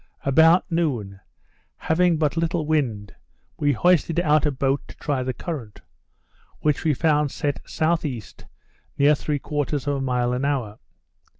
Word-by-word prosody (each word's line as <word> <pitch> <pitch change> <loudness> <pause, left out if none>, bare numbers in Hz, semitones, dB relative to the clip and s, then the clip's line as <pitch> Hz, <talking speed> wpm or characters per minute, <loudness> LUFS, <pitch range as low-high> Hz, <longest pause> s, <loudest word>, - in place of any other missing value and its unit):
About 160 +6 +5
noon, 120 - -1 0.6
having 170 +1 +2
but 150 -1 0
little 165 -1 -1
wind, 120 -10 -1 0.5
we 145 -1 +2
hoisted 170 +3 +2
out 155 -3 +3
a - - +1
boat 135 +1 0
to - - -13
try 140 -3 -2
the 130 0 -2
current, 130 - -7 0.8
which 150 -2 +1
we 155 -3 +2
found 150 0 +2
set 145 +1 -3
S.E. 155 -8 -1 0.7
near 145 +2 +5
3/4 145 0 -2
of 145 -1 -2
a 140 -1 0
mile 125 -2 0
an 125 +2 -2
hour. 130 -7 -2
145 Hz, 140 wpm, -23 LUFS, 130-160 Hz, 0.8 s, About